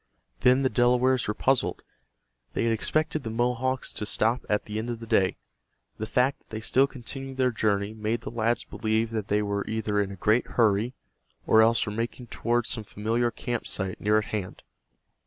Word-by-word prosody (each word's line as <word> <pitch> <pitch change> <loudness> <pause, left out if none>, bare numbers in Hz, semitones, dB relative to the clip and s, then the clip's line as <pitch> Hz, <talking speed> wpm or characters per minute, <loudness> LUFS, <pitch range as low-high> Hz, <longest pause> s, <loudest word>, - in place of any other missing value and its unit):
Then 130 +2 +4
the 130 - +3
Delawares 125 +1 +3
were 105 - -1
puzzled. 135 -1 +1 0.7
They - - 0
had 115 -1 +2
expected 155 +7 0
the 115 - -5
Mohawks 125 +3 0
to - - -5
stop 115 +3 +1
at 105 0 +1
the 105 +1 -4
end 115 +2 -4
of 120 -1 -4
the 115 - -8
day. 110 -5 +2 0.6
The 110 - -3
fact 125 +4 +1
that - - -37
they 110 - -5
still 130 +5 +3
continued 135 +1 -7
their 130 -1 +3
journey 105 -2 0
made 110 +2 -2
the - - -6
lads 115 0 0
believe 110 0 -1
that 110 -3 -3
they 105 +1 +1
were 100 0 -1
either 110 -2 0
in 100 -1 -2
a - - -6
great 110 +5 +2
hurry, 115 +2 +3 0.5
or 110 - +6
else 115 +1 +4
were 105 - -4
making 115 +2 -4
toward 120 0 0
some 115 -1 -3
familiar 115 +4 0
camp 120 0 -4
site 95 -2 -3
near 105 +1 +3
at 110 - 0
hand. 100 -4 -4
115 Hz, 195 wpm, -27 LUFS, 105-125 Hz, 0.7 s, or